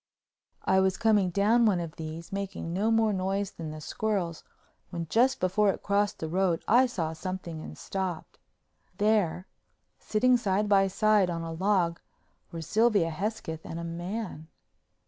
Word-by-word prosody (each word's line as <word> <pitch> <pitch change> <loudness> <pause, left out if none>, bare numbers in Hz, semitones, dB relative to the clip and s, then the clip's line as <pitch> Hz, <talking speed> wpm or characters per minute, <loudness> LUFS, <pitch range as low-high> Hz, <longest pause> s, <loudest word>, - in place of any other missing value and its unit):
I 190 - +4
was 190 0 +2
coming 210 -4 +3
down 215 +6 +3
one 190 -4 +2
of 170 -2 -5
these, 160 +3 -7
making 195 -4 -4
no 205 +5 +1
more 225 -1 +3
noise 195 +1 -1
than 160 -2 -7
the 155 0 -7
squirrels, 180 -1 -2 0.5
when 170 -1 -4
just 255 +4 +3
before 190 +3 +2
it - - -2
crossed 205 0 +1
the 160 - -4
road 175 0 0
I 250 +4 +5
saw 165 -9 -3
something 170 -1 -5
and - - -9
stopped. 190 -4 -5 0.6
There, 205 -4 +1 0.5
sitting 250 +4 +3
side 210 -2 0
by 195 -1 +4
side 210 -1 +3
on 165 -1 -3
a 165 0 -5
log, 180 -1 +1 0.5
were 165 -1 -5
Sylvia 210 -2 +2
Hesketh 165 -2 -4
and 165 - -6
a - - -5
man. 175 0 -5
190 Hz, 160 wpm, -28 LUFS, 170-210 Hz, 0.6 s, I